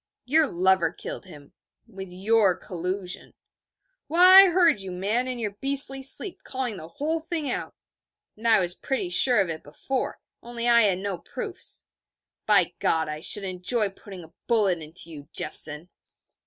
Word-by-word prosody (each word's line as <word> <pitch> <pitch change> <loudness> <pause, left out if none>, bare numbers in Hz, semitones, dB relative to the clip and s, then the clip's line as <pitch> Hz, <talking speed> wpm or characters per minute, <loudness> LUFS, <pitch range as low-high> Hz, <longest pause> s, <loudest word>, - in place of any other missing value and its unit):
'Your 305 +4 +2
lover 185 -4 +1
killed - - -9
him 145 -5 -15 0.3
with 195 -4 -11
your 195 +1 +1
collusion. 180 +1 -4 0.7
Why, 365 +5 +8
I - - +1
heard 340 - +2
you, 190 - -7
man, 205 +8 -3
in 255 -1 -4
your 215 -3 -4
beastly 270 0 +3
sleep, 275 +8 +2
calling 255 -5 -5
the 160 - -10
whole 305 - -4
thing 315 -4 -4
out. - - -6 0.6
And 225 +2 -6
I 225 -2 +4
was 175 -1 +3
pretty 260 -5 -4
sure 245 +5 +6
of 190 -3 0
it 160 -1 -6
before, 250 - -5 0.2
only 235 0 -4
I 235 -1 +5
had 190 -3 +1
no 190 -2 -5
proofs. - - -5 0.6
By - - +2
God, 160 -1 -1
I 150 0 -7
should 205 +4 +4
enjoy 195 +4 +1
putting 195 -2 -13
a 160 - -18
bullet 205 -7 +1
into 160 +2 -1
you, 145 -1 -12
Jeffson!' 155 +2 +1
200 Hz, 165 wpm, -24 LUFS, 180-255 Hz, 0.7 s, Why